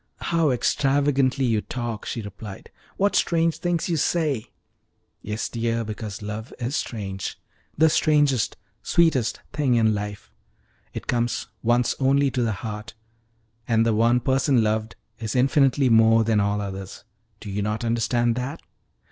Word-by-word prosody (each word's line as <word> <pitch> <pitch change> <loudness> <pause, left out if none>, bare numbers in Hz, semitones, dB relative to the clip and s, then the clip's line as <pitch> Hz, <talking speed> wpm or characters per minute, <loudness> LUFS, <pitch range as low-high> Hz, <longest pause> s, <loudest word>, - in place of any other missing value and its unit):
"How 165 -3 +1
extravagantly 135 +1 +2
you 110 -3 +1
talk!" 120 -3 -5
she 115 - -4
replied. 100 0 -9 0.3
"What 200 +1 +2
strange 165 -1 +2
things 175 -2 -1
you 170 -3 0
say!" 150 -6 0 0.7
"Yes, 105 +1 -3
dear, 115 0 -1
because 105 -1 -6
love 105 +3 -6
is 125 +3 -3
strange 95 -8 -4 0.4
the 160 +2 +6
strangest, 145 -6 +2 0.2
sweetest 155 -9 +2
thing 145 -4 +2
in 110 -2 +3
life. 105 -9 -5 0.6
It - - -7
comes 120 -1 -1
once 120 +1 +2
only 135 +1 +3
to 125 - -1
the 115 -2 +1
heart, 105 0 -6 0.7
and 115 -1 +3
the 115 - +2
one 115 +3 +3
person 130 -1 +2
loved 110 +1 -1 0.2
is 110 0 -4
infinitely 135 +1 +3
more 115 0 +5
than 110 -1 +2
all 100 0 0
others. 95 -1 -7 0.4
Do 105 - -7
you 100 +1 -2
not 105 +3 -2
understand 120 +1 +1
that?" 135 +6 -4
120 Hz, 145 wpm, -24 LUFS, 110-135 Hz, 0.7 s, the